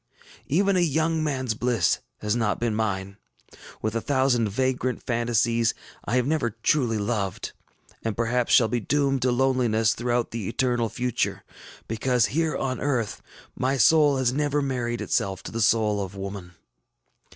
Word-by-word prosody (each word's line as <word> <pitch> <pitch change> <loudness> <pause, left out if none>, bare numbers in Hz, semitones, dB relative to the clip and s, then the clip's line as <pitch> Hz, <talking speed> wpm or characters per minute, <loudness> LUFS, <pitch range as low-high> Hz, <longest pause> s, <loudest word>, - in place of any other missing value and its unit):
Even 195 +6 +2
a - - +3
young 160 0 +1
manŌĆÖs 130 -7 -2
bliss 120 -2 +1 0.2
has 105 +1 0
not 110 -3 0
been 115 -2 0
mine. 100 -3 -2 0.7
With 110 0 -1
a 115 - -1
thousand 130 -5 +1
vagrant 130 +3 -1
fantasies, 115 -1 +1 0.3
I 120 - -1
have 125 -1 +2
never 145 -4 0
truly 125 -7 +2
loved, 100 -3 -2 0.5
and 115 -2 -2
perhaps 120 +1 0
shall 115 - +6
be 120 +2 -1
doomed 135 +2 0
to 130 0 +2
loneliness 120 -4 +2
throughout 120 0 -1
the 115 -4 -4
eternal 120 -3 0
future, 125 +1 -2 0.4
because, 120 +1 +1
here 160 0 0
on 130 -1 -2
earth, 125 -7 -1 0.3
my 135 +2 0
soul 145 +3 +5
has 125 -2 +1
never 145 +1 0
married 125 -4 -2
itself 95 -2 -1
to - - -7
the 115 - -3
soul 105 -1 +2
of 95 0 -8
woman. 95 -2 -7
120 Hz, 155 wpm, -25 LUFS, 110-135 Hz, 0.7 s, shall